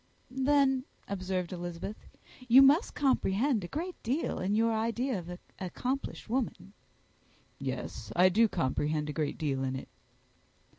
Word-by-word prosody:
"Then," 265 0 +2 0.2
observed 185 -2 -3
Elizabeth, 175 +3 -6 0.4
"you 260 +3 +9
must 290 - +4
comprehend 255 -4 +2
a - - -4
great 345 - -5
deal 270 +8 -1
in 195 +3 0
your 225 +1 +3
idea 230 +1 0
of 175 0 -9
an 180 - -6 0.2
accomplished 250 +9 -3
woman." 225 -4 -2 0.9
"Yes; - - -5
I 180 +1 +6
do 225 +5 +4
comprehend 150 -1 -1
a - - -8
great 150 -1 -2
deal 140 -4 -1
in 130 0 -1
it." 130 - -7
215 Hz, 140 wpm, -30 LUFS, 175-265 Hz, 0.9 s, you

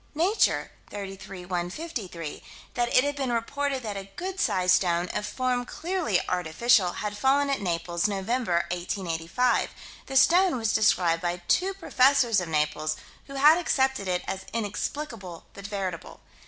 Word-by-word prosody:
Nature, 365 +8 +2 0.2
33 195 -2 -8
153: 180 - -5 0.3
That 240 0 0
it 255 - +5
had 285 0 -1
been 270 -3 -2
reported 270 +3 -1
that 210 -2 -4
a 195 0 -7
good 380 +2 -5
sized 185 - +3
stone, 175 -1 0
of 210 - -3
form 255 0 -1
clearly 325 - -1
artificial, 180 +3 +2
had 210 -1 -4
fallen 275 +5 +2
at 275 - -1
Naples, 170 0 -1
November, 200 -2 0
1885. 180 +5 0 0.4
The 270 - 0
stone 355 +2 +5
was 225 -2 0
described 175 -6 +3
by 175 0 -2
two 380 +1 +2
professors 260 - +3
of 175 - -5
Naples, 155 0 0 0.3
who 275 - -9
had 300 +5 +6
accepted 265 - +1
it 180 -1 0
as 190 0 -4
inexplicable 210 - -4
but 200 0 -8
veritable. 190 -5 -5
210 Hz, 145 wpm, -27 LUFS, 180-270 Hz, 0.4 s, had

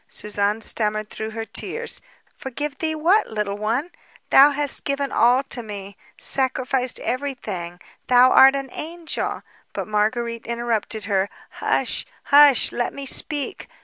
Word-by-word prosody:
Suzanne 210 +1 -1
stammered 215 -1 -1
through 220 0 -5
her 225 0 -5
tears: 470 - -4 0.3
"Forgive 280 +2 -5
thee 315 -1 -1
what, 355 +8 +3
Little 210 -2 -3
One? 240 +11 -1 0.4
Thou 280 +2 +8
hast 290 -1 +1
given 280 -1 -2
all 245 +3 +4
to 255 -2 -4
me, 200 -3 -8 0.2
sacrificed 260 -1 0
everything; 240 -10 -4 0.3
thou 250 +1 +6
art 270 +1 +7
an 275 -2 -4
angel...." 330 +1 -4 0.3
But - - -4
Marguérite 230 +2 -1
interrupted 230 -2 -2
her: 200 -1 0 0.2
"Hush, - - -1 0.2
hush! 285 -2 +6
Let 240 0 -2
me 280 0 -6
speak 290 +1 -1
245 Hz, 135 wpm, -22 LUFS, 215-280 Hz, 0.4 s, Thou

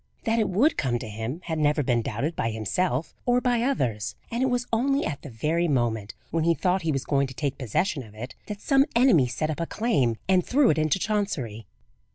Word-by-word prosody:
That 225 +1 +1
it 215 - +1
would 250 - +3
come 125 -3 +1
to 115 - -7
him, 110 - -5
had 160 -2 -3
never 150 0 +2
been 120 -2 +1
doubted 135 +10 -3
by 115 - -1
himself 120 - -1
or 245 0 +3
by 245 -2 +1
others; 125 - -1 0.2
and 235 +2 -1
it 265 - +3
was 245 -1 0
only 275 +5 +2
at 145 -2 -4
the 145 - -9
very 155 +9 0
moment 115 -7 -1 0.2
when 165 0 +1
he 170 0 +3
thought 185 +5 +1
he 165 -2 0
was 135 -2 -2
going 140 -1 +1
to 130 - -10
take 140 -2 -2
possession 140 - 0
of 110 -4 -13
it, 120 +4 -7
that 210 -1 -6
some 275 0 +3
enemy 235 - +5
set 155 +6 -2
up 155 - -5
a 170 - -2
claim 145 - +1
and 185 -1 +4
threw 275 -1 +4
it 155 - 0
into 155 +3 +2
Chancery. 170 - -2
155 Hz, 225 wpm, -26 LUFS, -, 0.2 s, enemy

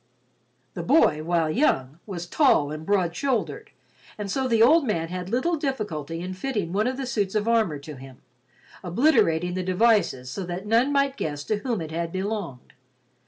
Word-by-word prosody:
The 175 - -5
boy, 170 - +3
while 165 0 +1
young, 155 - +1
was 175 -4 -5
tall 175 - +3
and 155 +1 -7
broad 185 -4 +1
shouldered, 265 -5 -2 0.5
and 205 -2 -4
so 265 +2 0
the 230 -2 +4
old 315 +7 +6
man 165 -10 -1
had 180 0 -5
little 290 - 0
difficulty 200 - -3
in 185 +1 -5
fitting 195 -4 -3
one 210 +4 +1
of 260 0 -2
the 270 - -3
suits 210 -6 -2
of 215 +1 0
armor 220 -10 +2
to 145 0 -10
him, 130 -1 -12 0.7
obliterating 180 - +2
the 185 - -2
devices 185 - +2
so 195 - -5
that 180 +3 -5
none 230 +6 +3
might 275 -1 +1
guess 145 - -3
to 215 - -1
whom 225 -2 -2
it 160 -1 -6
had 165 +1 -3
belonged. 190 - -5
195 Hz, 180 wpm, -25 LUFS, 165-235 Hz, 0.7 s, old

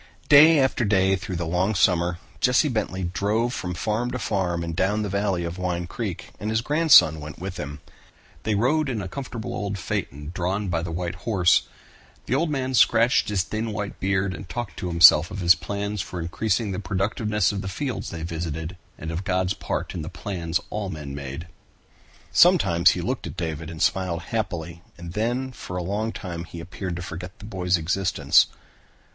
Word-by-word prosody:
Day 155 +3 +8
after 130 -2 +2
day 95 -2 +3
through 95 -1 -5
the 85 0 -2
long 90 +6 0
summer, 90 -2 +2 0.2
Jesse 125 +4 +3
Bentley 100 -6 -2
drove 105 +7 0
from 90 -6 -4
farm 110 +6 -1
to 125 - -3
farm 95 -6 -1
up - - -3
and 85 -1 -4
down 105 +5 +1
the 105 - -3
valley 100 -2 0
of 85 +2 -5
Wine 90 -1 -2
Creek, 100 0 -5
and 105 - -3
his 110 +1 +1
grandson 145 - +6
went 75 +1 -8
with 90 0 -6
him. 75 +1 -6 0.6
They 110 +2 0
rode 140 +7 +2
in 120 -4 -2
a - - -5
comfortable 115 +2 -6
old 100 -1 -3
phaeton 75 -3 -4
drawn 95 +3 -1
by 85 -2 0
the 85 - -4
white 85 +1 -3 0.2
horse. 90 -5 +4 0.6
The - - -2
old 155 +5 +1
man 130 -3 -2
scratched 120 -1 +4
his 100 -4 +1
thin 110 +3 -3
white 105 -1 -5
beard 95 0 0
and 95 -2 -9
talked 120 +2 -5
to 90 - -4
himself 85 -2 +7
of - - -6
his 85 -1 +6
plans 100 +3 -3
for 90 - -6
increasing 100 +5 -1
the 95 - -3
productiveness 100 +1 0
of 100 -1 -3
the 100 - -5
fields 125 +6 -3
they 80 -1 -6
visited 80 0 -4 0.2
and 80 +1 -5
of 85 +3 -3
God's 95 -1 0
part - - -4
in 85 - -4
the 75 - -5
plans 85 -3 -3
all 105 -2 -3
men 75 -5 -6
made. 70 +3 -6 0.9
Sometimes 100 - +5
he - - -2
looked - - -3
at - - -9
David 80 -2 -4
and 80 -1 -8
smiled 90 -3 0
happily 85 -6 -3 0.2
and 85 -1 -8
then 120 +5 -1
for 90 -6 -7
a 90 - -2
long 105 +5 -2
time 85 -5 -6
he 85 +1 -9
appeared 90 +1 -5
to 90 - -5
forget 90 0 -7
the 105 - -11
boy's 90 -3 0
existence. 90 +3 +3
95 Hz, 195 wpm, -24 LUFS, 85-110 Hz, 0.9 s, Day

